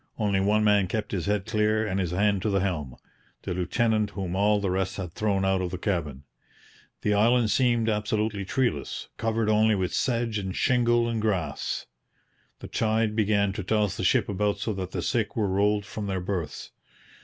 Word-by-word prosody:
Only 100 Hz, -3 st, +1 dB
one 105 Hz, +2 st, +2 dB
man 105 Hz, -2 st, +4 dB
kept 105 Hz, +2 st, -3 dB
his 95 Hz, -2 st, -2 dB
head 105 Hz, -2 st, 0 dB
clear 110 Hz, 0 st, +1 dB
and 100 Hz, -2 st, -1 dB
his 90 Hz, -3 st, 0 dB
hand 100 Hz, +2 st, +1 dB
to 110 Hz, -, 0 dB
the 100 Hz, -2 st, +1 dB
helm 75 Hz, -10 st, -2 dB, 0.5 s
the -, -, -3 dB
lieutenant 110 Hz, +4 st, +1 dB
whom 95 Hz, -3 st, -4 dB
all 105 Hz, +1 st, +3 dB
the 100 Hz, -2 st, -1 dB
rest 95 Hz, +1 st, -1 dB
had 90 Hz, -4 st, -5 dB
thrown 100 Hz, -2 st, 0 dB
out 95 Hz, -1 st, +2 dB
of 90 Hz, -, -2 dB
the 90 Hz, -, -5 dB
cabin. 80 Hz, -8 st, -2 dB, 0.8 s
The 105 Hz, -, +2 dB
island 115 Hz, +2 st, +3 dB
seemed 120 Hz, -1 st, +2 dB
absolutely 105 Hz, -1 st, -1 dB
treeless, 95 Hz, -, -2 dB
covered 115 Hz, -1 st, 0 dB
only 110 Hz, 0 st, +4 dB
with 95 Hz, -2 st, -2 dB
sedge 115 Hz, -4 st, 0 dB
and 95 Hz, -2 st, -4 dB
shingle 120 Hz, -2 st, +2 dB
and 115 Hz, -2 st, -1 dB
grass. 90 Hz, -9 st, -2 dB, 0.8 s
The -, -, -7 dB
tide 110 Hz, -1 st, 0 dB
began 100 Hz, -2 st, +2 dB
to 105 Hz, -, -4 dB
toss 105 Hz, 0 st, +1 dB
the -, -, -4 dB
ship -, -, +3 dB
about 100 Hz, +1 st, 0 dB
so 105 Hz, +2 st, -2 dB
that 95 Hz, -2 st, -4 dB
the -, -, -4 dB
sick 110 Hz, -5 st, -1 dB
were 110 Hz, -3 st, +1 dB
rolled 100 Hz, +2 st, +1 dB
from 105 Hz, +1 st, -5 dB
their 95 Hz, -1 st, -1 dB
berths. 90 Hz, -3 st, -4 dB
105 Hz, 190 wpm, -26 LUFS, 95-110 Hz, 0.8 s, man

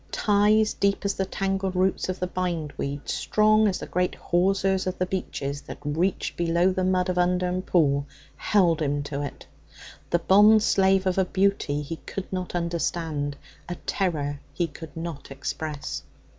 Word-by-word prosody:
Ties 210 Hz, +1 st, +3 dB
deep 200 Hz, 0 st, 0 dB
as 200 Hz, -, +1 dB
the 190 Hz, -1 st, -2 dB
tangled 195 Hz, -1 st, -2 dB
roots 185 Hz, 0 st, +1 dB
of 185 Hz, -, -3 dB
the 180 Hz, -, 0 dB
bindweed, 160 Hz, -6 st, -3 dB
strong 215 Hz, 0 st, +3 dB
as 190 Hz, -, 0 dB
the -, -, -6 dB
great 180 Hz, 0 st, -1 dB
hawsers 190 Hz, +1 st, +1 dB
of 185 Hz, -, -2 dB
the 185 Hz, -, +1 dB
beeches 145 Hz, -6 st, -4 dB
that -, -, -9 dB
reached 160 Hz, +6 st, -1 dB
below 170 Hz, +2 st, +2 dB
the 185 Hz, 0 st, -1 dB
mud 185 Hz, 0 st, +2 dB
of 180 Hz, -1 st, 0 dB
Undern 180 Hz, +1 st, +1 dB
Pool, 145 Hz, -6 st, +2 dB, 0.3 s
held 175 Hz, -6 st, +2 dB
him 145 Hz, -1 st, 0 dB
to 145 Hz, 0 st, -4 dB
it, 145 Hz, -, -6 dB, 0.6 s
the 170 Hz, -, +3 dB
bondslave 195 Hz, 0 st, +5 dB
of 185 Hz, 0 st, +1 dB
a 190 Hz, -, +3 dB
beauty 185 Hz, -6 st, 0 dB
he 165 Hz, +3 st, -5 dB
could 190 Hz, +3 st, -7 dB
not 185 Hz, -1 st, -3 dB
understand, 165 Hz, -4 st, -2 dB, 0.3 s
a 175 Hz, -, -3 dB
terror 145 Hz, -7 st, -1 dB, 0.2 s
he 175 Hz, -, +1 dB
could 160 Hz, 0 st, -10 dB
not 165 Hz, -3 st, -6 dB
express. 145 Hz, +2 st, -4 dB
180 Hz, 160 wpm, -25 LUFS, 160-190 Hz, 0.6 s, bondslave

